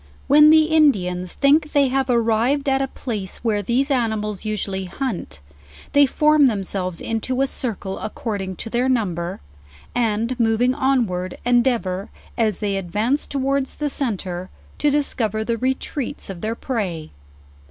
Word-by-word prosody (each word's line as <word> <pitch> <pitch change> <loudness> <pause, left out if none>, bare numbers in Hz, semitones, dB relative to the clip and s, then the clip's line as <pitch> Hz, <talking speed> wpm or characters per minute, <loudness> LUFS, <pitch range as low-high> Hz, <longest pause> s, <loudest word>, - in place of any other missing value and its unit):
When 300 +2 +7
the 315 0 +7
Indians 195 - +2
think 300 +2 +3
they 280 -3 +4
have 265 0 0
arrived 235 +4 +2
at 270 0 +2
a 270 - 0
place 210 -8 -5
where 215 -3 +1
these 255 +7 0
animals 220 -5 -1
usually 200 -3 -2
haunt, 190 - -4 0.5
they 285 -1 +6
form 300 +1 +4
themselves 190 -5 -2
into 250 +4 -1
a - - +4
circle 215 -8 -4
according 205 -3 -4
to 225 - -7
their 250 +2 +1
number, 180 - -1 0.5
and 230 +1 0
moving 230 +2 +2
onward, 235 -10 0
endea 245 0 +3
vor, 185 0 -5 0.3
as 215 -5 +1
they 200 -2 -1
advance 210 +10 -1
towards 275 0 -1
the 295 -1 -2
centre, 190 -9 -3 0.3
to 295 - +3
discover 230 -7 0
the 230 +1 -1
re 260 +2 +1
treats 280 -5 -5
of 175 -3 -9
their 220 +1 -2
prey. 190 - -3
230 Hz, 150 wpm, -21 LUFS, 200-270 Hz, 0.5 s, When